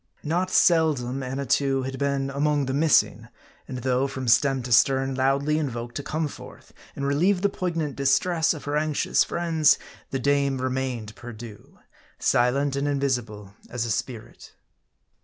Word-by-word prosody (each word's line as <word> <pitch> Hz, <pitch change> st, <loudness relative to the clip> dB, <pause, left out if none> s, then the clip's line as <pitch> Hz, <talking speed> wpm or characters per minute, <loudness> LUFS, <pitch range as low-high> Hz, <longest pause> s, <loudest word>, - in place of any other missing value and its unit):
Not 175 Hz, +4 st, -1 dB
seldom 150 Hz, -8 st, +2 dB
Annatoo 135 Hz, +1 st, 0 dB
had 130 Hz, 0 st, -5 dB
been 140 Hz, -1 st, -1 dB
among 145 Hz, 0 st, 0 dB
the 130 Hz, -, -3 dB
missing; 150 Hz, +2 st, +2 dB, 0.4 s
and 130 Hz, -, -6 dB
though, 130 Hz, +1 st, +1 dB
from 130 Hz, -2 st, -6 dB
stem 135 Hz, +2 st, +3 dB
to 125 Hz, -, -6 dB
stern, 135 Hz, +3 st, +3 dB
loudly 140 Hz, +3 st, +1 dB
invoked 120 Hz, -5 st, -4 dB
to -, -, -3 dB
come 155 Hz, +2 st, -2 dB
forth -, -, -13 dB, 0.2 s
and 140 Hz, -, -4 dB
relieve 180 Hz, +7 st, +1 dB
the 200 Hz, -, +4 dB
poignant 165 Hz, -7 st, -3 dB
distress 160 Hz, +5 st, +2 dB
of 150 Hz, -, -9 dB
her 145 Hz, +1 st, -1 dB
anxious 150 Hz, -1 st, +1 dB
friends, 165 Hz, -3 st, +2 dB, 0.3 s
the 135 Hz, -, -2 dB
dame 140 Hz, 0 st, +1 dB
remained 130 Hz, -4 st, -3 dB
perdu; 115 Hz, -3 st, -11 dB, 0.4 s
silent 135 Hz, +3 st, +1 dB
and 140 Hz, +1 st, -1 dB
invisible 120 Hz, -8 st, -2 dB, 0.2 s
as 120 Hz, -1 st, -3 dB
a 115 Hz, -, -2 dB
spirit. 115 Hz, +2 st, -6 dB
135 Hz, 150 wpm, -25 LUFS, 130-150 Hz, 0.4 s, the